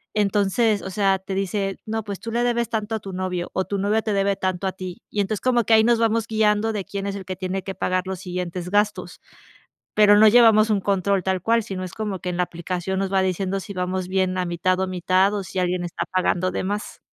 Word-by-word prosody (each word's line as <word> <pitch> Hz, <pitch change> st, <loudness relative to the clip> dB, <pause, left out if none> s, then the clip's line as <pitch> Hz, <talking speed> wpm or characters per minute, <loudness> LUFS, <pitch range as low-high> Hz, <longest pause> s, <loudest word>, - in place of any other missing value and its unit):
Entonces, 205 Hz, +1 st, +2 dB
o -, -, -5 dB
sea, 195 Hz, -1 st, +2 dB
te 190 Hz, 0 st, -5 dB
dice: 195 Hz, 0 st, -2 dB
"No, 220 Hz, 0 st, -3 dB
pues 200 Hz, -2 st, -6 dB
tú 230 Hz, -, -6 dB
le 240 Hz, +1 st, 0 dB
debes 235 Hz, -1 st, 0 dB
tanto 220 Hz, 0 st, -2 dB
a 220 Hz, -, -2 dB
tu 195 Hz, -1 st, -8 dB
novio. 180 Hz, -1 st, -3 dB
O 190 Hz, -, 0 dB
tu 200 Hz, -, -3 dB
novio 210 Hz, +3 st, +1 dB
te 215 Hz, -, -1 dB
debe 200 Hz, 0 st, +1 dB
tanto 185 Hz, 0 st, -1 dB
a 190 Hz, -, -2 dB
ti". 185 Hz, -2 st, -8 dB
Y 205 Hz, -, 0 dB
entonces 205 Hz, +1 st, -2 dB
como 245 Hz, -2 st, +2 dB
que 225 Hz, -, +3 dB
ahí 220 Hz, -, +6 dB
nos 235 Hz, -1 st, +3 dB
vamos 230 Hz, 0 st, +1 dB
guiando 220 Hz, 0 st, +1 dB
de 205 Hz, -2 st, -2 dB
quién 200 Hz, 0 st, -4 dB
es 200 Hz, -, -3 dB
el 195 Hz, -2 st, -7 dB
que 185 Hz, +1 st, -4 dB
tiene 185 Hz, 0 st, -3 dB
que 195 Hz, 0 st, -6 dB
pagar 185 Hz, 0 st, 0 dB
los 190 Hz, -1 st, -4 dB
siguientes 180 Hz, -1 st, -4 dB
gastos. 205 Hz, +1 st, 0 dB, 0.7 s
Pero 210 Hz, -1 st, +6 dB
no 220 Hz, -, +7 dB
llevamos 220 Hz, -1 st, +6 dB
un 210 Hz, -2 st, +2 dB
control 195 Hz, 0 st, +1 dB
tal 190 Hz, 0 st, 0 dB
cual, 230 Hz, +4 st, +2 dB
sino 190 Hz, -3 st, -5 dB
es 185 Hz, -, -7 dB
como 210 Hz, -4 st, -3 dB
que 180 Hz, -, -4 dB
en 180 Hz, -, -3 dB
la 180 Hz, -, +2 dB
aplicación 180 Hz, +2 st, -3 dB
nos 195 Hz, 0 st, -2 dB
va 190 Hz, -, +4 dB
diciendo 190 Hz, +1 st, -1 dB
si 200 Hz, +1 st, -8 dB
vamos 185 Hz, 0 st, -2 dB
bien 185 Hz, 0 st, 0 dB
a 180 Hz, -, 0 dB
mitad 180 Hz, +2 st, 0 dB
o 190 Hz, -, +1 dB
mitad, 185 Hz, +2 st, +2 dB
o 200 Hz, -, -2 dB
si 185 Hz, -, -8 dB
alguien 180 Hz, 0 st, 0 dB
está 175 Hz, -, -3 dB
pagando 185 Hz, 0 st, +1 dB
de -, -, -3 dB
más. 205 Hz, +2 st, -4 dB
195 Hz, 250 wpm, -23 LUFS, 185-210 Hz, 0.7 s, no